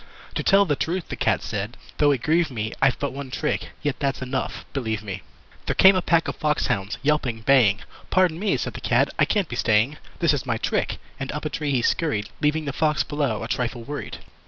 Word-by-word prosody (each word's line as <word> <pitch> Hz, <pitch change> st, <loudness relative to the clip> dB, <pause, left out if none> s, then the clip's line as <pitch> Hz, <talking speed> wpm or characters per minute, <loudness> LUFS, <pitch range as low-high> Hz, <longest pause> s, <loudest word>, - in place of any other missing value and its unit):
"To -, -, -1 dB
tell 200 Hz, +1 st, +5 dB
the 150 Hz, -5 st, +1 dB
truth," 170 Hz, +5 st, -2 dB
the -, -, -3 dB
Cat -, -, +1 dB
said, 105 Hz, +2 st, -4 dB, 0.2 s
"though 145 Hz, -, +5 dB
it 135 Hz, -4 st, +1 dB
grieve 165 Hz, +2 st, +3 dB
me 110 Hz, -4 st, -3 dB
I've 135 Hz, -2 st, +4 dB
but 140 Hz, -, -3 dB
one 140 Hz, -1 st, -6 dB
trick. 150 Hz, +4 st, -2 dB
Yet 145 Hz, -4 st, -1 dB
that's 140 Hz, -2 st, -1 dB
enough 130 Hz, +1 st, -3 dB
believe 110 Hz, -6 st, -2 dB
me!" 100 Hz, -2 st, -5 dB, 0.5 s
There -, -, 0 dB
came 190 Hz, 0 st, +7 dB
a 185 Hz, -, +2 dB
pack 165 Hz, -2 st, +2 dB
of -, -, -3 dB
fox 150 Hz, -1 st, +1 dB
hounds 100 Hz, +2 st, -1 dB
yelping, 135 Hz, -6 st, +1 dB
baying. 115 Hz, -5 st, +4 dB, 0.3 s
"Pardon 180 Hz, -3 st, +3 dB
me", 205 Hz, +1 st, +1 dB
said -, -, -3 dB
the -, -, -8 dB
Cat. -, -, +3 dB
"I -, -, +6 dB
can't 200 Hz, -5 st, +1 dB
be 120 Hz, -, -5 dB
staying. 115 Hz, +5 st, +2 dB, 0.2 s
This 170 Hz, -3 st, +3 dB
is 145 Hz, -, -1 dB
my 120 Hz, -5 st, -1 dB
trick." -, -, -1 dB, 0.2 s
And 135 Hz, 0 st, -3 dB
up 150 Hz, +1 st, -5 dB
a 155 Hz, -, -2 dB
tree 150 Hz, -1 st, -2 dB
he 130 Hz, -4 st, +1 dB
scurried, 110 Hz, -11 st, 0 dB
Leaving 150 Hz, +1 st, +1 dB
the 140 Hz, -, -3 dB
Fox 150 Hz, +2 st, +2 dB
below 140 Hz, -8 st, -1 dB
a -, -, -4 dB
trifle 120 Hz, 0 st, -2 dB
worried. 145 Hz, +4 st, -6 dB
140 Hz, 230 wpm, -24 LUFS, 115-155 Hz, 0.5 s, came